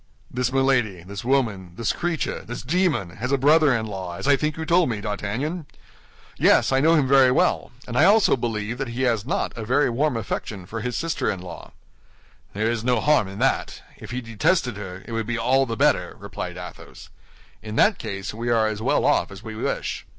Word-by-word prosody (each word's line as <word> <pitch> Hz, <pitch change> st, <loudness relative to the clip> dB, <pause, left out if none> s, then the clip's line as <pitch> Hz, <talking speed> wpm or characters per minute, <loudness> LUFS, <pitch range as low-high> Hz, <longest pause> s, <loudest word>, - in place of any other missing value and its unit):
"This 125 Hz, 0 st, -1 dB
Milady, 125 Hz, -9 st, +1 dB
this 100 Hz, +2 st, -7 dB
woman, 110 Hz, -9 st, 0 dB
this 115 Hz, +2 st, -1 dB
creature, 175 Hz, -2 st, -2 dB
this 120 Hz, -, -7 dB
demon, 150 Hz, -, 0 dB
has 125 Hz, +4 st, -3 dB
a 140 Hz, -, +3 dB
brother 150 Hz, +2 st, +5 dB
in 110 Hz, -1 st, -1 dB
law, 95 Hz, -4 st, -6 dB
as -, -, -5 dB
I 145 Hz, -, +6 dB
think 150 Hz, +2 st, -2 dB
you 160 Hz, -, -4 dB
told 170 Hz, 0 st, +3 dB
me, 110 Hz, -3 st, -2 dB
D'Artagnan?" 110 Hz, -, -3 dB, 0.7 s
"Yes, -, -, +4 dB
I 135 Hz, -, +3 dB
know 160 Hz, +4 st, +4 dB
him 145 Hz, -4 st, +2 dB
very 135 Hz, -1 st, +6 dB
well; 125 Hz, -, +1 dB, 0.2 s
and 120 Hz, -, -6 dB
I 150 Hz, +6 st, +5 dB
also 210 Hz, +2 st, +5 dB
believe 115 Hz, -1 st, -3 dB
that 135 Hz, -, -2 dB
he 120 Hz, +2 st, -3 dB
has 115 Hz, -3 st, 0 dB
not 200 Hz, +6 st, -1 dB
a 115 Hz, -, -5 dB
very 130 Hz, +4 st, +2 dB
warm 135 Hz, +1 st, 0 dB
affection 100 Hz, -3 st, -5 dB
for 115 Hz, +5 st, -6 dB
his 125 Hz, +1 st, -3 dB
sister 165 Hz, 0 st, -1 dB
in 95 Hz, -, -2 dB
law." 90 Hz, -2 st, -10 dB, 0.8 s
"There 105 Hz, +2 st, -1 dB
is 115 Hz, -1 st, -3 dB
no 125 Hz, -1 st, +2 dB
harm 145 Hz, -5 st, +3 dB
in 95 Hz, +1 st, -9 dB
that. -, -, -1 dB
If -, -, -11 dB
he 125 Hz, +1 st, -3 dB
detested 120 Hz, -, 0 dB
her, 95 Hz, -2 st, -8 dB
it -, -, -10 dB
would 115 Hz, -1 st, -2 dB
be 120 Hz, -1 st, -1 dB
all 130 Hz, +4 st, +2 dB
the 115 Hz, -1 st, -4 dB
better," -, -, +2 dB
replied -, -, -6 dB
Athos. -, -, -10 dB, 0.5 s
"In 110 Hz, 0 st, -7 dB
that 210 Hz, -, +3 dB
case 100 Hz, 0 st, -5 dB
we 115 Hz, +2 st, -4 dB
are 115 Hz, -2 st, +3 dB
as 110 Hz, -1 st, -2 dB
well -, -, +1 dB
off -, -, +2 dB
as 100 Hz, +1 st, -11 dB
we 110 Hz, -, -7 dB
wish." 110 Hz, -, -3 dB
120 Hz, 215 wpm, -23 LUFS, 105-140 Hz, 0.8 s, I